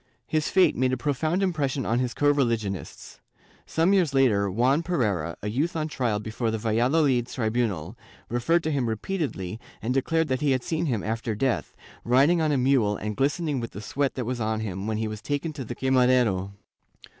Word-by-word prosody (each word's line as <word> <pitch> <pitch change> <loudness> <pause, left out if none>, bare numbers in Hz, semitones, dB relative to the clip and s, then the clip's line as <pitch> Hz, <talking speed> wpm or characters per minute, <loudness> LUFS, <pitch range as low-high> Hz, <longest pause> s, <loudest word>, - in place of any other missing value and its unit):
His 155 -1 0
fate 185 -4 +4
made 130 +1 +1
a - - 0
profound 155 +7 0
impression 145 -7 -1
on 115 +2 +1
his 125 -1 -2
co 145 0 +3
religionists. 115 - -2 0.5
Some 165 +5 +2
years 175 -8 +2
later, 105 -7 +3
Juan 125 - +2
Pereira, 105 - -1
a - - -2
youth 140 +12 -1
on 155 -1 -1
trial 120 -8 -1
before 110 +2 -3
the 110 - -1
Valladolid 120 +4 +2
tribunal, 110 -7 -2 0.3
referred 125 +9 +1
to 155 - -1
him 130 -5 0
repeatedly 110 - -3 0.2
and 120 +4 -2
declared 160 +5 +1
that 130 0 0
he 145 -2 +3
had 130 -1 -1
seen 165 0 -1
him 115 -7 -1
after 115 0 -2
death, 125 +3 -1 0.3
riding 140 +8 +4
on 155 -1 +2
a 145 - +2
mule 125 -6 +2
and 105 0 -4
glistening 145 - 0
with 115 - -6
the - - -7
sweat 140 +6 -1
that 125 - -3
was 125 +1 -3
on 110 0 -1
him 95 -1 -4
when 110 -1 -1
he 110 0 -1
was 110 -1 -6
taken 145 +4 -2
to 140 -3 -6
the 120 +1 -6
quemadero. 125 -7 +2
125 Hz, 195 wpm, -26 LUFS, 110-145 Hz, 0.5 s, fate